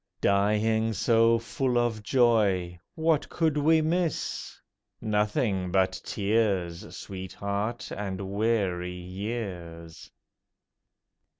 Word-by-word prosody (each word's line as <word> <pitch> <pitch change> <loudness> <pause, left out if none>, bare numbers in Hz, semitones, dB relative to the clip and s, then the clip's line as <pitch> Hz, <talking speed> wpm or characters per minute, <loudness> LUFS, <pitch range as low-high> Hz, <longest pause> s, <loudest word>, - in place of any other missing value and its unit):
Dying 105 +3 +2
so 115 +1 +4
full 125 +2 -1
of 120 -3 0
joy, 105 -7 +2 0.2
what 160 -2 +1
could 160 -3 +1
we 160 +2 +4
miss? 170 0 -2 0.4
Nothing 105 -3 0
but 95 0 +1
tears, 100 -5 -1
Sweetheart, 100 +4 -4
and 95 -2 -4
weary 100 -4 0
years. 90 -4 -6
105 Hz, 85 wpm, -27 LUFS, 95-115 Hz, 0.4 s, so